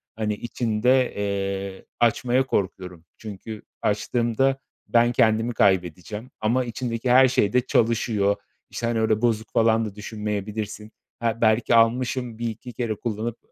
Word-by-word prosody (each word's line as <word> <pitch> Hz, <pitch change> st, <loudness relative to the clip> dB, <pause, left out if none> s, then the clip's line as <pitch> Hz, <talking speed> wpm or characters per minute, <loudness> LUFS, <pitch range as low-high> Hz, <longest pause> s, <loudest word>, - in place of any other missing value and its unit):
hani, 105 Hz, -1 st, -1 dB
içinde, 120 Hz, +3 st, +1 dB
eee, 100 Hz, -1 st, -3 dB
açmaya 120 Hz, +2 st, +2 dB
korkuyorum. 90 Hz, -7 st, -3 dB
Çünkü 105 Hz, 0 st, -8 dB, 0.2 s
açtığımda 120 Hz, +5 st, +1 dB, 0.3 s
ben 120 Hz, 0 st, +4 dB
kendimi 115 Hz, 0 st, +2 dB
kaybedeceğim 95 Hz, +3 st, 0 dB
ama 125 Hz, +4 st, +1 dB
içindeki 120 Hz, +1 st, -3 dB
her 130 Hz, +1 st, +7 dB
şey 105 Hz, -5 st, +1 dB
de 125 Hz, -, +4 dB
çalışıyor. 110 Hz, -4 st, +1 dB, 0.3 s
İşte, 115 Hz, -, -3 dB
hani, 115 Hz, -1 st, 0 dB
öyle 110 Hz, -1 st, +1 dB
bozuk 115 Hz, -2 st, 0 dB
falan 115 Hz, -1 st, +3 dB
da 105 Hz, -2 st, -7 dB
düşünmeyebilirsin. 105 Hz, 0 st, -5 dB, 0.3 s
Ha, 115 Hz, 0 st, -1 dB
belki 115 Hz, +1 st, +3 dB
almışım, 120 Hz, +1 st, +2 dB
1-2 120 Hz, +1 st, -5 dB
kere 115 Hz, -3 st, -2 dB
kullanıp 115 Hz, +2 st, -4 dB
110 Hz, 130 wpm, -24 LUFS, 105-120 Hz, 0.3 s, her